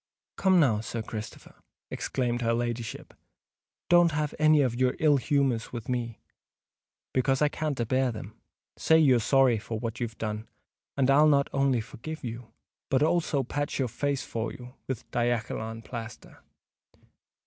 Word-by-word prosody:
"Come, 190 -2 +4
now, 120 -9 +3
Sir 115 0 -4
Christopher," 110 -1 -8 0.4
exclaimed 120 -2 -2
her 115 0 +1
ladyship; 120 -1 -4 0.7
"don't 175 -2 +5
have 150 -1 -1
any 155 -1 +5
of 125 -3 0
your 125 +1 +1
ill 150 -2 +4
humours 135 -3 0
with 120 -3 -6
me, 120 -2 -3 0.9
because 135 +1 +2
I 150 - +3
can't 150 -3 -3
a 120 - +1
bear 130 +2 +1
them. 110 - -8 0.4
Say 160 - +4
you're 135 -6 +5
sorry 130 -1 +3
for 115 +1 -5
what 115 0 -4
you've 115 -2 -4
done, 110 0 -4 0.5
and 135 -1 +3
I'll 150 +3 +6
not 140 -2 +3
only 135 -3 +2
forgive 155 +9 -8
you, 115 -1 -7 0.4
but 135 +2 +3
also 155 -4 +1
patch 145 +3 -3
your 130 -3 0
face 140 +3 -2
for 115 0 -3
you 125 0 -11
with 130 -4 -4
diakkulum 115 -1 -2
plaster. 115 -1 -9
125 Hz, 155 wpm, -28 LUFS, 115-145 Hz, 0.9 s, I'll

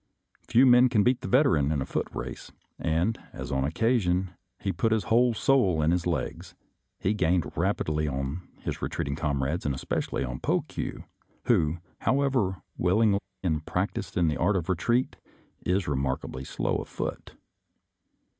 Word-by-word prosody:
Few 125 +3 +5
men 125 0 +7
can 110 -5 +3
beat 125 +2 +2
the - - -5
Veteran 125 - +3
in 75 - 0
a 65 - -2
foot - - -2
race, - - -6 0.3
and, 85 +8 0
as - - -6
on 65 -1 +1
this 75 - -2
occa 115 +5 +2
sion 90 0 0 0.3
he 100 - -1
put 95 +6 0
his 110 -2 +2
whole 120 +1 +3
soul 105 -11 +3
in 80 - +3
his 90 0 0
legs, 85 -4 -3 0.4
he 100 - 0
gained 90 -5 +1
rapidly 75 0 0
on 70 +4 -3 0.2
his - - -4
retreating 70 0 -2
comrades, 70 +1 -1
and 70 -2 -1
espe 65 - -2
cially 65 - -3
on 60 +1 -5
Pokue, - - -2 0.4
who, 80 +2 +2 0.2
however 130 -9 +1 0.2
willing 100 +2 +3 0.2
and 80 -4 0
prac - - -1
ticed - - -5
in 85 -2 +3
the 75 - 0
art 100 +4 +2
of 90 -1 -2
retreat, 120 +8 +1 0.5
is 90 +1 +1
remarkably 65 -2 -2
slow - - -1
of - - -5
foot. - - -5
90 Hz, 170 wpm, -27 LUFS, 75-115 Hz, 0.5 s, men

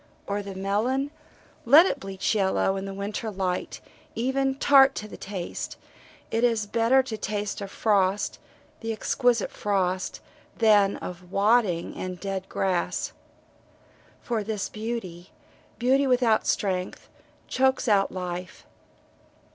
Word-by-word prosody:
Or 205 +1 -2
the 200 -1 -8
melon 225 +9 0 0.5
let 295 +9 +8
it - - -1
bleach 195 +1 -2
yellow 195 -1 +1
in 195 0 -4
the 195 - -5
winter 205 +3 -4
light, 185 -3 -3 0.3
even 265 +3 0
tart 275 -1 +6
to 215 - -5
the - - -10
taste 190 -3 -6 0.5
it 225 +1 0
is 230 -3 +2
better 230 +5 +3
to 230 -4 -5
taste 205 -1 -3
of 200 - -5
frost 200 -2 +1 0.4
the 225 -1 -3
exquisite 235 +1 +1
frost 190 -2 -1 0.4
than 210 -3 +4
of 180 0 -8
wadding 200 -4 +2
and 185 0 -4
of 180 - -12
dead 195 -1 -4
grass. 185 -3 -1 1.1
For 230 -3 -1
this 210 -1 -3
beauty, 215 -6 -5 0.5
beauty 265 +3 +3
without 245 -4 +3
strength, 185 -2 -1 0.4
chokes 265 0 +1
out 200 -3 +3
life. 180 0 -6
205 Hz, 130 wpm, -26 LUFS, 190-235 Hz, 1.1 s, let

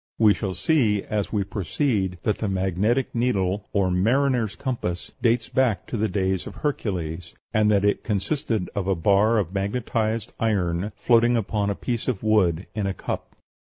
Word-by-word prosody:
We 110 -2 +6
shall 95 -3 -3
see, 110 - +2
as 105 -2 -2
we 105 -2 +1
proceed, 95 - -1
that 105 - 0
the 110 - -1
magnetic 95 +7 0
needle, 105 -5 0
or 95 -3 +1
"mariner's 115 +3 +2
compass," 105 -10 -3
dates 115 -1 +2
back 120 -8 +1
to - - -5
the 110 0 +1
days 95 -2 -1
of - - -9
Hercules, 90 - -3 0.2
and 110 -1 +3
that 100 -1 +3
it 105 - +1
consisted 110 - -1
of 100 -2 -2
a 95 - +2
bar 100 +6 +3
of 95 -4 -1
magnetized 110 +2 -1
iron 100 -3 0
floating 120 0 +3
upon 105 -1 -1
a 100 - -1
piece 115 +8 -3
of 115 -6 -1
wood 95 -5 +2
in 105 -2 -1
a 95 - -2
cup. - - -5
105 Hz, 170 wpm, -24 LUFS, 95-115 Hz, 0.2 s, We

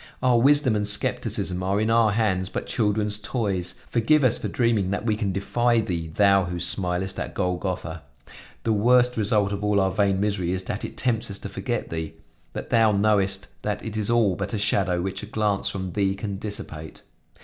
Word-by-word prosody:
Our 125 -2 +4
wisdom 140 -3 +4
and 105 -1 0
skepticism 95 -3 0
are 95 +2 0
in 110 +1 +1
our 115 -1 +4
hands 95 -4 0
but - - -4
children's 105 -2 0
toys; 100 -5 -2
forgive 135 +6 +2
us 125 -2 +3
for - - -3
dreaming 115 -6 +1
that 100 +3 -3
we 110 -2 +1
can 105 -2 -2
defy 120 +5 +1
Thee, 85 -7 -2
Thou 100 +3 +3
who 90 0 -4
smilest 90 +1 0
at - - -5
Golgotha. 90 -2 -3 0.6
The 115 - +1
worst 125 +3 +3
result 105 -2 +1
of 100 0 -4
all 105 -1 +2
our 95 -1 +2
vain 100 -2 +1
misery 100 -4 -1
is 95 0 -3
that - - -4
it - - -7
tempts 115 -4 0
us 100 - -2
to - - -7
forget - - -4
Thee. 80 -1 -4 0.4
But - - -7
Thou 115 -2 +4
knowest 100 -1 +2 0.2
that 105 0 -3
it 110 -1 -5
is 110 -1 -1
all 115 -6 +3
but 115 - -3
a - - -1
shadow, 90 -3 +1
which 95 0 -4
a 105 - -8
glance 105 -2 0
from 95 -2 -4
Thee 95 0 0
can 100 -1 -5
dissipate. 80 -7 -6
100 Hz, 200 wpm, -24 LUFS, 95-110 Hz, 0.6 s, Our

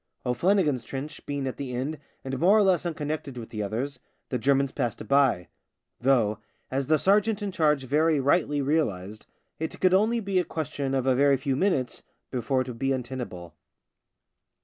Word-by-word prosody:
O'Flannigan's 150 - +2
trench 140 +4 -6
being 145 -1 -2
at 130 - -4
the 130 -3 -4
end 140 +5 -3 0.3
and 135 -1 -3
more 195 +6 +5
or 215 - +5
less 185 -3 +2
unconnected 150 -4 -4
with 115 -2 -8
the 110 - -4
others, 125 +7 -3 0.3
the 125 - -1
Germans 135 +2 +2
passed 120 -5 -2
it - - -5
by: 130 -7 +2 0.5
though, 120 -5 +2 0.3
as 135 0 -1
the 155 - +4
sergeant 205 +5 +2
in 200 - -2
charge 150 -5 +2
very 150 +3 +2
rightly 145 0 +2
realised, 110 - -1 0.3
it 160 - -4
could 185 -1 +4
only 220 +5 +3
be 195 -3 0
a - - +2
question 145 -4 -3
of 130 -1 0
a 130 - +4
very 140 +1 +4
few 135 0 -1
minutes 140 -6 0 0.3
before 130 +1 0
it 130 - -4
would 120 -2 -7
be 135 +1 +1
untenable. 120 -10 -5
140 Hz, 180 wpm, -27 LUFS, 125-160 Hz, 0.5 s, more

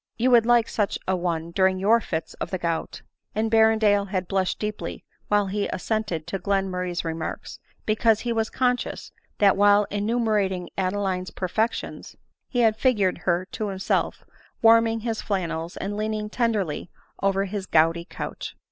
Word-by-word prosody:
— - - -56
You 250 +3 +2
would 235 -2 +6
like 240 -1 +4
such 205 -2 -1
a 190 - +2
one 170 -2 -2
during 190 +1 +2
your 215 +5 +4
fits 160 -5 -4
of - - -2
the 185 - -2
gout 165 -2 -3
;" - - -44
and 220 +1 0
Berrendale 220 -2 +4
had 185 -2 -2
blushed 190 -1 0
deeply 210 0 -5 0.2
while 205 -1 +3
he 200 +1 -1
assented 205 -6 -2
to 190 +3 -4
Glenmurray's 180 -2 -1
remarks, 160 -1 -5 0.3
because* 220 0 +3
he 240 -1 -1
was 225 -1 0
conscious, 250 -1 -1 0.3
that 200 -2 +5
while 205 +1 +5
enumerating 205 -3 0
Adeline's 190 -1 -1
perfections, 215 +5 -3 0.3
he 245 - +1
had 220 -2 +3
figured 210 -8 +2
her 175 +1 +1
to 215 - -3
himself 190 -1 -1 0.4
warming 225 0 +5
his 225 -1 -2
flannels, 170 -4 -3
and 200 +2 -3
leaning 215 0 -2
tenderly 210 -11 -1 0.3
over 195 0 +2
his 195 0 -5
gouty 165 +2 +3
couch. - - -6
200 Hz, 160 wpm, -25 LUFS, 185-220 Hz, 0.4 s, would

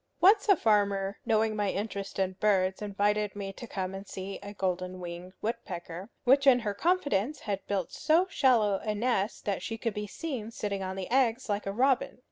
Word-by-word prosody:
Once 410 +3 +5
a 400 - +8
farmer, 200 - +1
knowing 220 0 +2
my 205 -2 0
interest 200 -1 -4
in 190 -1 +1
birds, 190 -2 +2
invited 205 0 0
me 195 -1 -5
to 240 - -9
come 190 -3 -3
and 195 +1 -7
see 195 +1 -6
a 200 - -7
golden 185 -2 -2
winged 175 +1 -7
woodpecker, 185 -4 -5
which 275 +2 +4
in 250 -2 +7
her 210 -3 -2
confidence 285 - 0
had 200 -2 -3
built 195 -4 -1
so 330 +4 +3
shallow 225 - +3
a 215 -1 -2
nest 210 -2 -1
that 200 -3 -1
she 225 +4 -4
could 230 -1 -2
be 210 +1 -4
seen 250 -2 -5
sitting 205 -3 -3
on 190 0 -3
the 190 -1 -4
eggs 255 -1 +2
like 205 0 -1
a - - 0
robin. 265 +5 +1
205 Hz, 195 wpm, -29 LUFS, 195-235 Hz, -, a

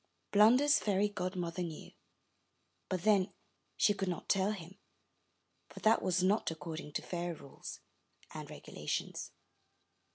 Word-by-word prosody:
Blunder's 255 +9 +6
fairy 205 0 +2
godmother 180 -3 -3
knew, 165 -3 -5 1.0
but 185 -2 -1
then 200 -3 +4 0.5
she 205 - +5
could 195 -1 -2
not 180 - -3
tell 195 +1 +3
him, 190 -1 -8 0.9
for - - -10
that 220 +1 +5
was 185 0 +1
not 200 +4 +3
according 160 -1 -6
to - - -2
fairy 175 -1 -3
rules 140 -3 -9 0.5
and - - -7
regulations. - - -4
185 Hz, 125 wpm, -34 LUFS, 175-210 Hz, 1.0 s, Blunder's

